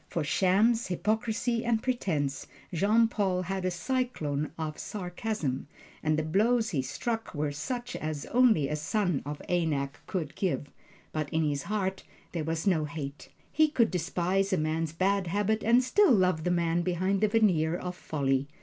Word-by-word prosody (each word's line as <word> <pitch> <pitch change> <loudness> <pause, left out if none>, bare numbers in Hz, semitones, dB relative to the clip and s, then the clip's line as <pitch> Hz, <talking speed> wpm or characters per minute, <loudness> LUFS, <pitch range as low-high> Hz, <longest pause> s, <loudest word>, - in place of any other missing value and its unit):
For 165 - -2
shams, 200 +9 +3
hypocrisy 220 +5 0
and 235 -2 +1
pretense 155 - -1 0.3
Jean 215 +7 +4
Paul 190 -5 0
had 190 0 -3
a - - +2
cyclone 175 - -2
of 155 -2 -4
sarcasm, 180 -8 -3 0.3
and 155 0 +1
the 155 - 0
blows 225 +8 +2
he 145 -7 +1
struck 225 - -3
were 145 0 -1
such 245 - -4
as 155 -2 -4
only 235 - +4
a 150 - -1
son 175 +1 0
of 145 0 -5
Anak 150 -6 0
could 165 -6 -3
give; 170 -7 -2 0.4
but 155 -2 -2
in 160 0 +1
his 145 -1 -1
heart 190 +1 -2 0.3
there 165 -3 -2
was 160 +1 -2
no 170 -6 +2
hate. 145 -1 -7 0.2
He 310 0 +4
could 250 -7 +2
despise 185 +2 0
a 190 - +2
man's 155 +1 -1
bad 190 +3 +1
habits 205 +4 0
and 235 +3 +5
still 355 +8 +4
love 185 -7 +3
the - - +2
man 170 -1 +1
behind 185 +3 0
the 215 - +5
veneer 180 -7 +3
of 180 0 -4
folly. 135 -5 -1
180 Hz, 170 wpm, -29 LUFS, 155-215 Hz, 0.4 s, and